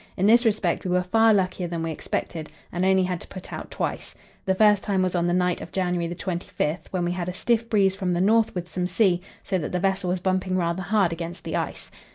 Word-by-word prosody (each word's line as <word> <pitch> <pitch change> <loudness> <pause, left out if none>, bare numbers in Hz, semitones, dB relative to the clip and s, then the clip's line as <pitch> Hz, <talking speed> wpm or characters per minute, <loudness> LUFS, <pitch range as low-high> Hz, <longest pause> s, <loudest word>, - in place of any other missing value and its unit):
In 190 - +1
this 235 +3 +6
respect 205 -6 +1
we 185 - -3
were 180 0 +2
far 225 +5 +4
luckier 185 -3 +1
than 170 -1 -3
we 165 - -2
expected, 160 0 -4 0.2
and 175 +1 -1
only 190 0 +4
had 180 -2 -2
to - - -11
put 185 - -9
out - - -6
twice. - - -4 0.3
The 190 -1 +2
first 210 0 +5
time 195 -2 0
was 185 - 0
on 175 -1 +1
the - - +1
night 180 0 +1
of - - -8
January 180 -2 0
25, 175 -2 -3
when 180 -2 -1
we 175 - 0
had 180 0 -3
a - - -4
stiff 230 +4 0
breeze 195 -3 +3
from 185 -2 -1
the 175 - 0
north 220 +3 +3
with 180 -1 -3
some 180 0 -2
sea, 180 -1 +2 0.2
so 190 - -1
that 150 - -4
the 180 - 0
vessel 190 -1 0
was 180 +1 0
bumping 185 0 0
rather 170 +1 0
hard 195 -3 +2
against 170 +1 -6
the - - -3
ice. - - -4
185 Hz, 245 wpm, -25 LUFS, 175-195 Hz, 0.3 s, this